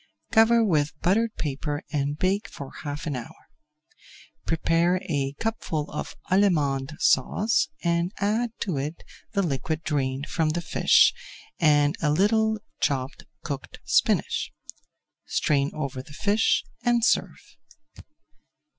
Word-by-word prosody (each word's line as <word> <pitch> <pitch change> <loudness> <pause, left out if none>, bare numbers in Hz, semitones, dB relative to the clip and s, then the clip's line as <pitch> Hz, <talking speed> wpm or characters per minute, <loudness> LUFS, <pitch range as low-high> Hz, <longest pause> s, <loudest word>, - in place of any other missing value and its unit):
Cover 230 0 +5
with 150 -5 0
buttered 220 +5 +2
paper 145 +1 -3
and 145 -1 -1
bake 195 +6 0
for 140 -9 -9
half 145 +1 -5
an 150 -4 -2
hour. 120 -2 -7 1.1
Prepare 165 +2 +2
a 140 -5 -1
cupful 190 -9 -2
of - - -5 0.2
Allemande 155 -8 +2
Sauce 205 - +2 0.2
and 170 +1 +1
add 215 +4 0
to 180 -8 -1
it 150 +4 -4 0.3
the 200 -2 +1
liquid 155 +1 -2
drained 135 -2 -1
from 160 -2 0
the 170 +3 -1
fish - - +5 0.5
and 145 -1 +4
a 150 - +2
little 220 +7 +2 0.2
chopped 135 0 -1 0.2
cooked 140 -4 -6
spinach. - - +1 0.8
Strain 140 -1 +1
over 135 -4 -4
the 145 +2 -14
fish 210 +7 +2 0.2
and 240 -2 +3
serve. - - -1
160 Hz, 120 wpm, -25 LUFS, 145-200 Hz, 1.1 s, Cover